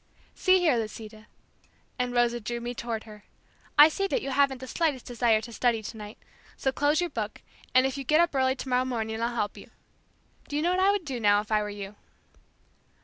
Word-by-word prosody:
"See 375 0 +4
here, 325 -9 +3
Lisita," 215 -1 -7 0.7
and 250 0 0
Rosa 240 0 +2
drew 235 +2 -4
me 240 +1 -4
toward 230 -2 -4
her, 210 -1 -13 0.5
"I 295 - +10
see 390 +5 -1
that 450 +3 -1
you 275 - -3
haven't 275 -1 +2
the 260 - -8
slightest 295 -4 -1
desire 235 -3 +2
to 235 +2 -9
study 230 -2 +1
tonight, 210 0 -8 0.4
so 265 - 0
close 290 +4 +1
your 350 - -1
book, 215 -2 -5 0.3
and 255 0 +6
if 265 +1 -2
you - - -4
get 305 +4 +3
up 340 -2 +3
early 260 -1 +2
tomorrow 255 -1 0
morning 225 -3 -3
I'll 235 +1 -1
help 210 -3 -2
you. - - -12 0.8
Do 290 - -4
you 300 - 0
know 350 - +2
what 365 - +1
I 390 - +5
would 400 -4 0
do 265 -4 -4
now 205 -2 +4
if 210 +1 -7
I 215 -1 +3
were 210 - -4
you." 205 0 -8
245 Hz, 215 wpm, -27 LUFS, 220-285 Hz, 0.8 s, I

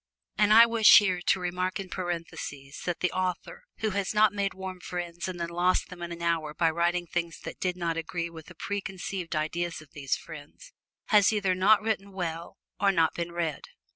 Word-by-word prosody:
And 210 +1 +3
I 230 +2 +10
wish 230 -2 +7
here 185 -4 +3
to 185 - +2
remark 180 +2 -2
in 195 - -5
parentheses 165 -6 -5
that 175 -1 -2
the 180 - +1
author 185 - -3 0.2
who 215 -1 0
has 200 +1 -2
not 210 -1 +5
made 200 -1 -1
warm 190 -1 -6
friends 175 -1 -5
and 180 -2 -5
then 170 0 -2
lost 175 +2 +1
them 180 -2 -10
in 175 0 -5
an 170 0 -6
hour 160 -3 0
by 165 0 +2
writing 175 +2 0
things 170 -1 -3
that - - -8
did 180 -1 -1
not 170 -2 -1
agree 170 +1 -3
with 160 -2 -11
the 180 - -13
preconceived 190 -2 -4
idea 160 +3 -1
of 155 -4 -10
these 140 -2 -1
friends, 160 - -12 0.4
has 210 -2 +6
either 200 -3 +1
not 200 +3 +4
written 200 -3 -2
well 170 -3 -5 0.2
or 200 0 +4
not 165 -4 +2
been 170 0 -4
read. 170 -4 -3
180 Hz, 200 wpm, -28 LUFS, 170-195 Hz, 0.4 s, I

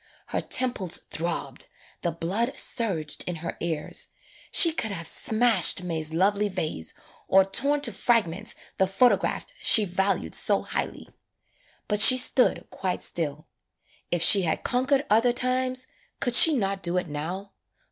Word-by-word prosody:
Her - - -3
tem 255 -1 -1
ples 185 -6 -2
throbbed, 160 -5 -5 0.3
the 175 - -2
blood 195 - -3
surged 175 - -1
in 175 - -5
her 170 - -5
ears, 160 -3 -4 0.4
she 335 - +6
could 225 -8 -3
have 170 -5 -6
smashed 220 -1 +2
May's 160 -3 -4
lovely 200 +5 0
vase, 155 - -6 0.3
or 190 0 +3
torn 285 +9 -1
to 255 -5 0
fragments 215 -2 -1 0.2
the 190 - +2
photograph 240 +6 0 0.2
she 215 -3 +5
valued 190 +1 -2
so - - +1
highly. - - -5 0.8
But 210 -1 0
she 255 +4 +10
stood 250 0 +1
quite 185 -2 -5
still. 155 -3 -4 0.6
If 175 -1 0
she 200 +2 +6
had 170 -3 -3
conquered 265 +3 -1
other 230 +3 +2
times, 255 +1 -2 0.3
could 245 - -1
she 315 +5 +9
not 195 -5 -3
do 175 0 -1
it 180 -1 -3
now? 175 +7 -7
195 Hz, 145 wpm, -24 LUFS, 170-240 Hz, 0.8 s, she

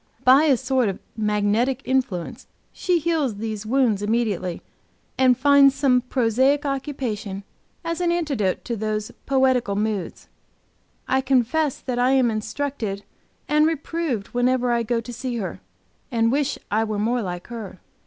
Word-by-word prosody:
By 265 +4 +6
a 275 -5 +4
sort 260 -3 +1
of 190 - -4 0.2
magnetic 215 +5 0
influence 250 -10 -2 0.3
she 360 -2 +1
heals 310 -8 0
these 215 0 -5
wounds 240 -5 +2
immediately, 205 -5 -1 0.5
and 255 -2 +4
finds 275 0 +5
some 270 -3 +3
prosaic 260 +3 +1
occupation 245 -8 -3 0.4
as 335 +1 -2
an 345 -1 +2
antidote 280 - -1
to 235 - -2
these 215 0 -3 0.2
poetical 260 -6 +2
moods. 210 -4 -3 0.8
I 265 0 +2
confess 270 +3 +1
that 250 -2 -3
I 250 +2 +3
am 255 -3 +3
instructed 215 -2 -3 0.4
and 300 +1 +4
reproved 320 -7 -2
whenever 245 0 +1
I 235 0 +2
go 230 +1 -1
to 245 +1 -9
see 245 +1 -4
her, 200 -5 -5 0.5
and 230 -1 +2
wish 285 +1 0
I 215 +2 +2
were 215 -1 -3
more 235 +4 0
like 180 -3 -5
her. 220 -6 -7
245 Hz, 145 wpm, -23 LUFS, 215-270 Hz, 0.8 s, By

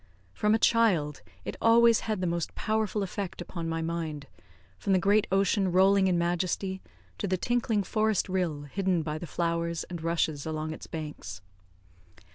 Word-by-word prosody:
From 210 +1 +2
a - - +3
child, 195 -11 +2 0.2
it - - -4
always 230 0 +6
had 210 -4 -1
the - - 0
most 170 -1 -2
powerful 215 -1 0
effect 195 0 -5
upon 170 -1 -5
my 165 0 -2
mind, 160 -3 -3 0.5
from 195 - 0
the - - +5
great 200 +3 +3
ocean 195 0 +2
rolling 190 +1 +5
in 180 -2 +2
majesty, 180 +2 -1 0.4
to 200 - -1
the 185 0 +1
tinkling 230 -1 0
forest 215 0 +1
rill, 180 -6 -1
hidden 180 +3 0
by 155 0 -3
the 175 - -7
flowers 170 0 -1
and 170 -2 -5
rushes 160 -3 0
along 155 0 -3
its - - -10
banks. 150 - -7
180 Hz, 165 wpm, -28 LUFS, 165-200 Hz, 0.5 s, always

